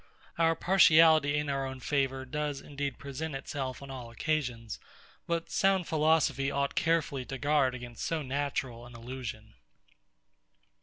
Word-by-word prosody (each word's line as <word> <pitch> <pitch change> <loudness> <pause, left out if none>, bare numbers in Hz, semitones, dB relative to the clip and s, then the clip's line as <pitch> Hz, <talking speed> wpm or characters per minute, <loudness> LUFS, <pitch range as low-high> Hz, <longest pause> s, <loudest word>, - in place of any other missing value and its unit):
Our 165 0 +4
partiality 160 -5 +5
in 150 0 -1
our 135 -1 -1
own 130 0 -7
favour 135 -1 -1
does 145 +1 -3
indeed 140 -2 -4
present 140 +2 -5
it 135 - -7
on 135 0 -4
all 125 -3 -7
occasions; 120 -4 -2 0.5
but 170 -1 -2
sound 195 -3 +2
philosophy 155 -3 +2
ought 140 0 -1
carefully 160 -5 +1
to 135 - -5
guard 140 -2 +2
against 120 -2 -8
so 160 -2 -1
natural 130 -3 -3
an 120 - -13
illusion. 115 -2 -7
140 Hz, 140 wpm, -30 LUFS, 130-155 Hz, 0.5 s, partiality